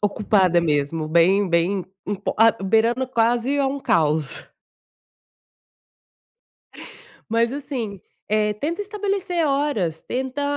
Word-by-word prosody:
ocupada 195 Hz, -4 st, +2 dB
mesmo, 155 Hz, 0 st, -1 dB
bem 185 Hz, +4 st, +3 dB
bem 170 Hz, +3 st, +1 dB, 0.2 s
imp 200 Hz, -1 st, -4 dB
a 225 Hz, +1 st, +6 dB
beirando 230 Hz, +6 st, +2 dB
quase 240 Hz, +3 st, +1 dB
a 275 Hz, -, +2 dB
um 275 Hz, +1 st, -3 dB
caos. 155 Hz, -, 0 dB, 2.8 s
Mas, 230 Hz, +2 st, +1 dB
assim, 245 Hz, -9 st, -5 dB, 0.3 s
eh, 210 Hz, 0 st, +1 dB
tenta 320 Hz, -, -3 dB
estabelecer 395 Hz, -5 st, -2 dB
horas, 275 Hz, -, -1 dB
tenta 260 Hz, +3 st, -3 dB
220 Hz, 100 wpm, -22 LUFS, 180-275 Hz, 2.8 s, a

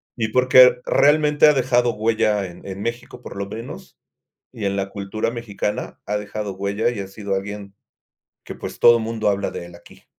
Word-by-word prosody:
y 110 Hz, -3 st, -2 dB
porque 125 Hz, 0 st, +6 dB
realmente, 150 Hz, +1 st, +4 dB
ha 150 Hz, -, +6 dB
dejado 125 Hz, -2 st, +2 dB
huella 105 Hz, -2 st, +1 dB
en 90 Hz, -1 st, -11 dB
en 95 Hz, 0 st, -6 dB
México, 120 Hz, +2 st, -5 dB
por -, -, -10 dB
lo 100 Hz, -, -3 dB
menos. 115 Hz, +4 st, -9 dB, 0.6 s
Y 105 Hz, -, -4 dB
en 100 Hz, 0 st, 0 dB
la 95 Hz, -1 st, -2 dB
cultura 100 Hz, +3 st, -3 dB
mexicana, 105 Hz, -4 st, -4 dB
ha 105 Hz, -, -1 dB
dejado 105 Hz, -1 st, -5 dB
huella. 100 Hz, +4 st, -1 dB
Y 120 Hz, -3 st, -5 dB
ha 100 Hz, -, -5 dB
sido 100 Hz, 0 st, -5 dB
alguien 100 Hz, 0 st, -6 dB, 0.7 s
que, -, -, -8 dB
pues, -, -, -7 dB
todo 120 Hz, 0 st, +7 dB
mundo 110 Hz, -1 st, -2 dB
habla 100 Hz, 0 st, 0 dB
de 85 Hz, -, -7 dB
él, 85 Hz, -, -14 dB
aquí. -, -, -18 dB
105 Hz, 190 wpm, -21 LUFS, 100-120 Hz, 0.7 s, todo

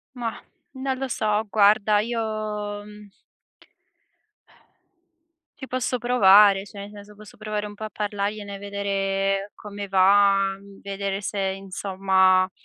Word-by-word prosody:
Mah! 235 Hz, -2 st, -5 dB, 0.3 s
Non 265 Hz, 0 st, -3 dB
lo 270 Hz, +1 st, -3 dB
so, 215 Hz, -3 st, 0 dB
guarda 210 Hz, 0 st, +4 dB
io, 235 Hz, +2 st, -2 dB, 0.7 s
mhmm 210 Hz, -1 st, -14 dB, 2.5 s
ci 265 Hz, -, -8 dB
posso 255 Hz, 0 st, -1 dB
provare 205 Hz, -5 st, +5 dB
cioé, 205 Hz, 0 st, -12 dB
ne 200 Hz, +1 st, -8 dB
senso 210 Hz, 0 st, -13 dB
posso 210 Hz, 0 st, -15 dB
provare 215 Hz, -1 st, -4 dB
un 205 Hz, 0 st, -9 dB
po' 220 Hz, -, -9 dB
a -, -, -6 dB
parlargliene 205 Hz, -1 st, -4 dB
e -, -, -7 dB
vedere 195 Hz, 0 st, -2 dB
come 205 Hz, -1 st, -8 dB
va, 195 Hz, 0 st, +4 dB
mhmm, 200 Hz, 0 st, -16 dB
vedere 200 Hz, 0 st, -4 dB
se, 200 Hz, 0 st, -4 dB
insomma, 190 Hz, -1 st, +1 dB
200 Hz, 130 wpm, -24 LUFS, 195-210 Hz, 2.5 s, provare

